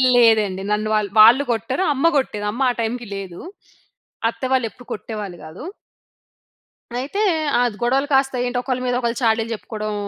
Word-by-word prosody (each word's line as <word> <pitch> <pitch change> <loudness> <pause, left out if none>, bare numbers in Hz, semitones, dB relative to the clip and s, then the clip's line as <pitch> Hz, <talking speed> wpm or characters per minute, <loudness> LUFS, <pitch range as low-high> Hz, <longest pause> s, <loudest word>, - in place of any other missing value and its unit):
లేదండి. 215 -5 +4
నన్ను 210 +1 0
వాళ్ళు 210 -2 0
వాళ్ళు 235 +6 +8
కొట్టారు. 255 - -1
అమ్మ 275 +3 -1
కొట్టేది. 210 -6 -2
అమ్మ 240 +6 -6
ఆ - - +2
టైమ్‌కి 235 +1 -3
లేదు. 190 -3 -7 0.9
అత్తవాళ్ళు 260 0 -1
ఎప్పుడు 245 - -17
కొట్టేవాళ్ళు 210 -5 -6
కాదు. 160 - -10 1.3
అయితే 290 +11 -3 0.4
ఆద్ 245 -3 +1
గొడవలు 265 +4 +1
కాస్త 270 0 +3
ఏంటి 245 0 -2
ఒకళ్ళ 255 0 -2
మీద 245 -1 0
ఒకళ్ళు 235 -1 -2
చాడీలు 225 -1 +1
చెప్పుకోవడం 215 +1 -5
230 Hz, 150 wpm, -21 LUFS, 215-255 Hz, 1.3 s, వాళ్ళు